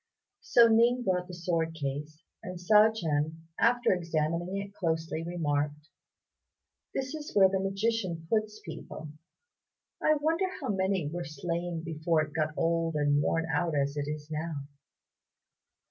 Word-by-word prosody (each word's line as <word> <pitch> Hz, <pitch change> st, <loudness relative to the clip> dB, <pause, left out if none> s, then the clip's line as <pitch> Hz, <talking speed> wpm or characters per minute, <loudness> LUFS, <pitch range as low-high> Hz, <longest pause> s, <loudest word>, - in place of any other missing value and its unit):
So 235 Hz, -1 st, +6 dB
Ning 235 Hz, +2 st, +4 dB
brought 180 Hz, -3 st, 0 dB
the 180 Hz, -, -9 dB
sword 165 Hz, -2 st, -1 dB
case, 150 Hz, +2 st, -5 dB, 0.2 s
and 180 Hz, 0 st, -6 dB
Hsiao 210 Hz, +5 st, +6 dB
ch'ien, 160 Hz, -6 st, -1 dB, 0.2 s
after 240 Hz, -1 st, +4 dB
examining 170 Hz, +1 st, -1 dB
it 200 Hz, 0 st, -5 dB
closely, 160 Hz, -3 st, -1 dB
remarked, 150 Hz, -3 st, -2 dB, 1.0 s
"This 265 Hz, +1 st, -3 dB
is 300 Hz, -1 st, -7 dB
where 195 Hz, -2 st, +7 dB
the 190 Hz, 0 st, 0 dB
magician 195 Hz, -3 st, -1 dB
puts 215 Hz, +2 st, 0 dB
people. 160 Hz, -1 st, -8 dB, 0.9 s
I 310 Hz, -, +4 dB
wonder 320 Hz, +5 st, +1 dB
how -, -, -4 dB
many 190 Hz, -4 st, 0 dB
were 175 Hz, +4 st, -4 dB
slain 170 Hz, +2 st, -3 dB
before 160 Hz, -1 st, +1 dB
it 150 Hz, 0 st, -8 dB
got 155 Hz, -1 st, -1 dB
old 165 Hz, -1 st, +1 dB
and 145 Hz, -1 st, +3 dB
worn 165 Hz, +2 st, +1 dB
out 170 Hz, -3 st, +1 dB
as 140 Hz, 0 st, 0 dB
it 145 Hz, -1 st, -2 dB
is 150 Hz, 0 st, -5 dB
now. 155 Hz, -2 st, -3 dB
170 Hz, 145 wpm, -30 LUFS, 155-195 Hz, 1.0 s, where